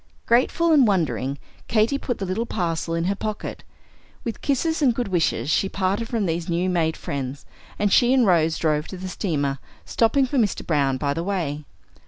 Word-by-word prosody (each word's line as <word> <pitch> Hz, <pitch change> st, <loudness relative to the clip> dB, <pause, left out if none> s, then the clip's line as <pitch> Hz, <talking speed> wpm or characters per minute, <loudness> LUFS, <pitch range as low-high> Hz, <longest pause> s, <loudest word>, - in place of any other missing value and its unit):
Grateful 265 Hz, +8 st, +3 dB
and 280 Hz, -6 st, +6 dB
wondering, 155 Hz, -8 st, 0 dB, 0.3 s
Katy 230 Hz, +5 st, +2 dB
put 245 Hz, -4 st, -3 dB
the 195 Hz, -, -3 dB
little 190 Hz, +6 st, -2 dB
parcel 165 Hz, -4 st, -2 dB
in 165 Hz, -, 0 dB
her 190 Hz, +3 st, +1 dB
pocket. 215 Hz, +1 st, -5 dB, 0.6 s
With 230 Hz, -, -5 dB
kisses 320 Hz, +4 st, 0 dB
and 255 Hz, -5 st, +3 dB
good 240 Hz, -3 st, -2 dB
wishes 170 Hz, -4 st, 0 dB
she 195 Hz, -, +2 dB
parted 195 Hz, +5 st, -1 dB
from 225 Hz, -4 st, 0 dB
these 165 Hz, 0 st, -2 dB
new 175 Hz, +2 st, 0 dB
made 160 Hz, -2 st, 0 dB
friends, 140 Hz, 0 st, -5 dB, 0.3 s
and 205 Hz, -1 st, +1 dB
she 245 Hz, 0 st, +5 dB
and 260 Hz, -2 st, +4 dB
Rose 165 Hz, -4 st, +3 dB
drove 150 Hz, -1 st, 0 dB
to 190 Hz, -, -7 dB
the 185 Hz, +1 st, -6 dB
steamer, 145 Hz, -8 st, -2 dB, 0.3 s
stopping 260 Hz, +4 st, +2 dB
for 260 Hz, +1 st, 0 dB
Mr. 210 Hz, -5 st, 0 dB
Browne 140 Hz, -4 st, +1 dB
by 140 Hz, +1 st, -1 dB
the 165 Hz, +3 st, -3 dB
way. 160 Hz, -7 st, -2 dB
185 Hz, 190 wpm, -23 LUFS, 160-230 Hz, 0.6 s, and